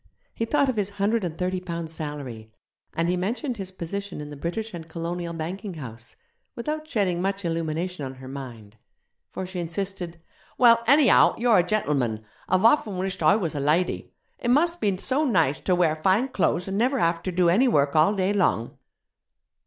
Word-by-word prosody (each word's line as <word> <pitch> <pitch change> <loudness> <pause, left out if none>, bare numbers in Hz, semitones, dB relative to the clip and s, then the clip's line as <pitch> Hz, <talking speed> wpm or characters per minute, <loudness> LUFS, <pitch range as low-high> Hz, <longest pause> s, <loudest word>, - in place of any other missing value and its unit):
He 230 - -2
thought 280 +3 +2
of 255 -4 -1
his 200 -2 0
hundred 210 +2 +1
and 165 -2 -4
thirty 185 0 -1
pounds' 170 -3 -5
salary; 140 -8 -6 0.4
and 165 +1 +1
he 180 - +1
mentioned 235 - -2
his 190 -2 -6
position 190 +1 -5
in 150 0 -7
the - - -7
British 185 +9 -4
and 165 -2 -7
Colonial 170 +1 -4
Banking 180 +4 -5
house, 115 -6 -9 0.4
without 305 +5 -4
shedding 185 -5 0
much 195 0 -2
illumination 165 0 -2
on 130 0 -5
her 130 0 -11
mind, 120 -6 -9 0.5
for 190 - -5
she 180 0 -6
insisted: 175 0 -4 0.4
'Well, 230 -2 +6
anyhow, 280 +1 +6
you're 235 -4 +4
a - - +4
gentleman. 140 - -1 0.2
I've 185 +3 +3
often 225 -6 +3
wished 190 0 -3
I 155 +5 +5
was 180 -7 -1
a 145 - -3
lady. 155 +6 0 0.3
It 240 - -2
must 335 +7 +3
be 200 -3 +1
so 265 +9 0
nice 165 - +2
ter 185 - +1
wear 170 -3 +2
fine 190 +11 +2
clo'es 180 -5 0
an' 195 +1 -2
never 255 +5 +2
have 170 -5 +1
ter 185 - -3
do 180 -1 +2
any 225 +10 +4
work 145 - +2
all 160 +7 +4
day 190 +1 +1
long.' 175 - +1
180 Hz, 190 wpm, -25 LUFS, 160-210 Hz, 0.5 s, Well